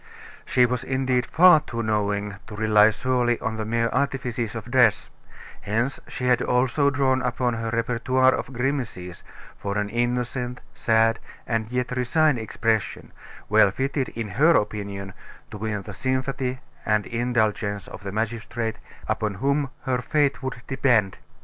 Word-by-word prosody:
She 125 - +4
was 125 0 -2
indeed 130 -2 0
far 175 -1 +7
too 115 -6 -5
knowing 105 -2 -1
to 110 - -8
rely 105 0 +5
solely 120 +1 0
on 110 0 -3
the 110 - -3
mere 115 +1 +1
artifices 125 -5 -2
of 115 +1 -7
dress; 120 -5 +3 0.5
hence, 115 +6 -1
she 125 - -5
had 125 -1 +3
also 130 +3 +2
drawn 130 -1 +1
upon 125 0 0
her 115 0 -3
repertoire 125 +3 +2
of - - -4
grimaces 120 -9 -3 0.4
for 100 0 -3
an 105 0 -1
innocent, 125 +2 -2
sad, 115 0 +2 0.3
and 115 -2 -1
yet 125 0 -1
resigned 130 +2 +2
expression, 110 0 -2 0.4
well 105 -1 +5
fitted, 135 +5 -2
in 115 -1 -3
her 150 - +4
opinion, 100 -2 -2 0.4
to 105 - -7
win 105 -2 -3
the 105 - -8
sympathy 130 +3 -2 0.3
and 105 -1 +1
indulgence 110 -4 -1
of - - -10
the 100 -1 -5
magistrate 115 +1 -3 0.3
upon 105 -2 -1
whom 140 +5 0
her 125 -1 0
fate 145 +2 +1
would 130 -2 -5
depend. 120 -8 +1
120 Hz, 150 wpm, -24 LUFS, 110-130 Hz, 0.5 s, far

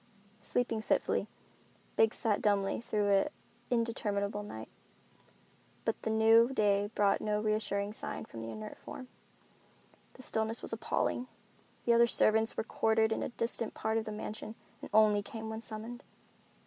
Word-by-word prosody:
Sleeping 225 +1 -1
fitfully, - - +1 0.7
Biggs 225 0 +4
sat 215 -3 +1
dumbly 200 0 +1
through 210 -3 0
an 200 +9 +4 0.4
interminable 210 -4 0
night, 110 - -7 1.2
but - - -1
the - - -2
new 225 +2 +6
day 205 -4 +2
brought 200 -1 +3
no 210 -1 0
reassuring 210 -1 -1
sign - - -5
from 115 - -9
the 115 - -5
inert 110 -1 -7
form. 255 -1 -9 1.0
The 260 - -10
stillness 220 -1 0
was - - -3
appalling. 245 +2 -1 0.6
The 235 - +5
other 235 0 +6
servants 220 0 +3
were - - 0
quartered 220 -1 +2
in - - 0
a - - -2
distant 230 -1 -2
part 220 +1 0
of 220 - -5
the 215 - -4
mansion 215 +1 -6 0.3
and - - -8
only 210 -1 +5
came 220 +2 -6
when 220 0 -5
summoned. 230 +2 -6
220 Hz, 150 wpm, -32 LUFS, 205-225 Hz, 1.2 s, new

